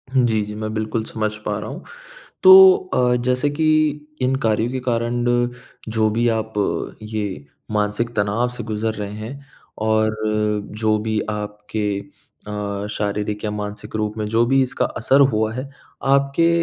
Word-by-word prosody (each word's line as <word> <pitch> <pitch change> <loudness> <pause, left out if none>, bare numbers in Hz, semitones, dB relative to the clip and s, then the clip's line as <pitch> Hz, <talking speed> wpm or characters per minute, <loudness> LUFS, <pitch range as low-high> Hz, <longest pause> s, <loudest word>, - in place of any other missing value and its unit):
जी, 120 -4 +3
जी, 105 0 -7
मैं 110 0 -4
बिल्कुल 110 +1 -2
समझ 110 -1 -2
पा 105 -1 -1
रहा - - -6
हूँ। - - -8 0.6
तो 380 0 +10 0.2
अ, 125 0 +3
जैसे 125 +3 +1
कि 155 +2 0 0.6
इन 130 +1 +2
कार्यों 110 +1 +1
के 130 0 -3
कारण 120 0 -1 0.6
जो 110 -1 +2
भी 115 +3 +1
आप 110 -1 -1 0.5
ये 105 -8 -4 0.3
मानसिक 105 +3 -1
तनाव 105 +4 +1
से 120 -2 -6
गुज़र 110 0 -2
रहे 105 -1 -5
हैं, 125 +7 -8 0.3
और 110 0 +1 0.6
जो 110 -1 +3
भी 110 0 -1
आपके 105 -1 -3 0.5
अ, 100 -1 -3
शारीरिक 105 0 -2
या 105 - -1
मानसिक 105 0 -6
रूप 105 0 -2
में 105 - -1
जो 115 +2 +3
भी 135 +2 +4
इसका 130 - -1
असर 135 +1 +3
हुआ 110 0 +1
है, 130 +2 -5 0.3
आपके 140 +4 +3
110 Hz, 155 wpm, -21 LUFS, 105-120 Hz, 0.6 s, तो